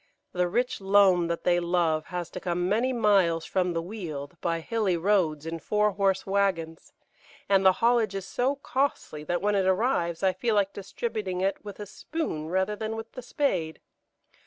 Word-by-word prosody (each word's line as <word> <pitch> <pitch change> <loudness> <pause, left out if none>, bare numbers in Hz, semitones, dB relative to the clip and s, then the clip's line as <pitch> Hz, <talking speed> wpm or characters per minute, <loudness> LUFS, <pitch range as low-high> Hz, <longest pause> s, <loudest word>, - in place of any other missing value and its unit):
The 180 0 0
rich 240 +4 -1
loam 195 -3 +4
that 170 0 -3
they 175 -1 +3
love 170 -3 +1
has 180 -2 -5
to - - -6
come 175 0 -1
many 230 +7 +1
miles 195 -8 +2
from 180 -2 0
the 165 0 -2
Weald 170 -7 -6
by 165 -1 0
hilly 200 0 0
roads 165 -5 +1
in 165 0 -4
four 210 +4 +1
horse 195 -1 0
waggons, 190 -5 -1 0.6
and 195 -1 +3
the 190 -1 +6
haulage 230 -4 +3
is 195 -1 -4
so 255 +7 0
costly 270 - -2
that 175 +3 -2
when 210 0 +2
it 195 -2 +2
arrives 190 -4 +1
I 190 -1 +3
feel 215 +5 0
like 200 -1 +1
distributing 200 -2 -4
it 195 +1 -1
with 205 -1 -9
a 210 - -5
spoon 205 - -4
rather 190 +4 0
than 220 +1 -4
with 225 0 -7
the 255 - -8
spade. 185 - -1
190 Hz, 185 wpm, -27 LUFS, 170-210 Hz, 0.6 s, the